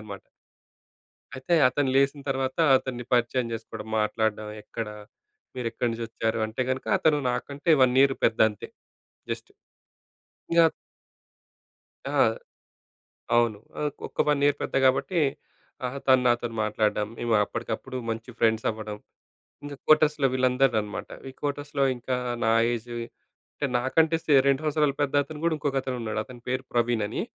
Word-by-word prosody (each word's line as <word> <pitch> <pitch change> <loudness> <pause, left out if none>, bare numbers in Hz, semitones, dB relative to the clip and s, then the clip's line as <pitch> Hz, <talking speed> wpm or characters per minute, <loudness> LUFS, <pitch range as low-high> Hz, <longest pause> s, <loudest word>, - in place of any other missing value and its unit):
ఉన్నాడనమాట. 100 -2 -8 1.2
అయితే 130 +6 0
అతను 135 +2 0
లేసిన 140 +1 +2
తర్వాత 135 -1 -1 0.2
అతన్ని 125 -2 -4
పరిచయం 120 +1 +2
చేసుకోవడం, 115 -1 -7
మాట్లాడడం, 105 0 -1
ఎక్కడ 115 +1 -5 0.7
మీరు 125 -2 -4
ఎక్కడి 120 +2 -1
నుంచి 115 0 -4
వచ్చారు? 115 0 -2
అంటే 110 +4 -3
గనుక, 130 0 -3
అతను 150 -2 +3
నాకంటే 140 +6 -2
1 125 -1 +4
ఇయర్ 135 -1 +3
పెద్ద 115 - +2
అంతే, 105 -2 -9 0.6
జస్టు - - -5 1.0
ఇగ 170 - +6 1.5
ఆ! - - -2 1.2
అవును. 115 -3 +2 0.2
ఆహ్, 150 -1 0 0.2
ఒక్క - - -5
1 145 -1 +2
ఇయర్ 145 0 +3
పెద్ద - - -5
కాబట్టి, 135 +7 +2 0.7
ఆహా! 130 +3 -4
తను 130 -1 +5
నాతోని 120 -1 0
మాట్లాడడం, 105 -1 0
మేము 120 -1 -1
అప్పటికప్పుడు 115 +4 -5
మంచి 115 +2 -5
ఫ్రెండ్స్ 110 -1 +2
అవ్వడం. 110 -1 -6 0.7
ఇంగ 145 0 -7
కోటర్స్‌లో, 150 -2 +4
వీళ్ళందరూ 130 0 +2
అనమాట. 105 -1 -6 0.2
ఈ - - -13
కోటర్స్‌లో 145 -1 -2
ఇంకా 125 +1 -2 0.3
నా 110 - +3 0.2
ఏజు 120 0 -5 0.6
అంటే, 145 - -2
నాకంటే 160 +6 +2
సె 150 - +1
2 140 +1 +2
సంవత్సరాలు 150 -2 +1
పెద్ద, 145 0 -1
అతను 150 +1 -9
కూడా 170 -1 +2
ఇంకొక 145 -2 -2
అతను 130 -1 -3
ఉన్నాడు. 110 -1 -2
అతని 120 +1 -13
పేరు 130 +1 -1
ప్రవీణ్ 120 -2 +1
అని, 105 - -4
125 Hz, 145 wpm, -26 LUFS, 115-140 Hz, 1.5 s, ఇగ